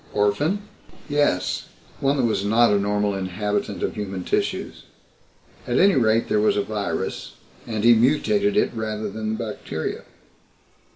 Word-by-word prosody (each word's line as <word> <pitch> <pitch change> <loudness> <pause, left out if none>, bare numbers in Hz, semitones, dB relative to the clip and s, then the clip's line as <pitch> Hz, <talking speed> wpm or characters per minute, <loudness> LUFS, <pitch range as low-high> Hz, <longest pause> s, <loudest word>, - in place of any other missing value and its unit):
"Orphan?" 145 - +1 0.4
"Yes 145 -11 0 0.3
one 140 +1 +1
that 130 - +1
was 110 -4 +1
not 115 +2 +4
a 100 - +3
normal 105 0 0
inhabitant 100 +2 -2
of - - -1
human 95 -3 -5
tissues. - - -2 0.8
At 120 - 0
any 195 +1 +5
rate 115 -4 +2
there 105 - +2
was 105 0 +2
a 100 - +1
virus 105 -1 -3 0.3
and 110 -2 -3
he 120 0 +8
mutated 195 - +2
it - - +3
rather 110 -2 -3
than 110 +1 -3
the - - -3
bacteria. 80 - -5
110 Hz, 150 wpm, -23 LUFS, 105-130 Hz, 0.8 s, he